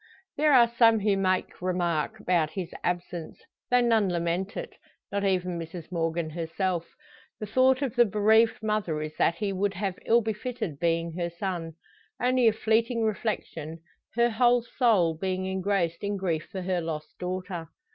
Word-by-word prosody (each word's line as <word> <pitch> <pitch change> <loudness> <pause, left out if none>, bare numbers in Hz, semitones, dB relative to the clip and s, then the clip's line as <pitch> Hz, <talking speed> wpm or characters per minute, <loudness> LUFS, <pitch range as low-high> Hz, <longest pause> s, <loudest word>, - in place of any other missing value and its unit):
There 300 +1 +3
are 245 -4 +7
some 230 -2 +4
who 205 -1 +2
make 185 -2 -1
remark 180 +2 -1
about 175 -6 +1
his 180 -2 -6
absence, 175 -2 -3 0.3
though 245 0 +4
none 225 -4 +3
lament 175 +3 -2
it - - -5 0.4
not 200 0 -1
even 180 -3 0
Mrs 165 +1 -8
Morgan 165 -1 -1
herself. 170 +1 -2 0.5
The 215 - -4
thought 260 +5 +3
of 260 -3 -2
the 240 -1 +6
bereaved 220 +2 +3
mother 210 -8 -1
is 155 0 -6
that 170 - +3
he 200 +1 -2
would 195 +1 -1
have 190 0 -3
ill 235 +1 +5
befitted 220 - -4
being 165 0 0
her 170 0 -1
son. 170 -2 -4 0.5
Only 250 -1 +3
a - - +6
fleeting 225 +2 +1
reflection, 195 -7 -3 0.4
her 235 0 +3
whole 240 +1 +3
soul 220 -10 +2
being 185 +2 -2
engrossed 190 -2 -1
in 205 0 -1
grief 170 -5 -2
for 190 -3 -4
her 180 -1 0
lost 155 -2 -6
daughter. 180 -2 -4
190 Hz, 165 wpm, -27 LUFS, 170-220 Hz, 0.5 s, are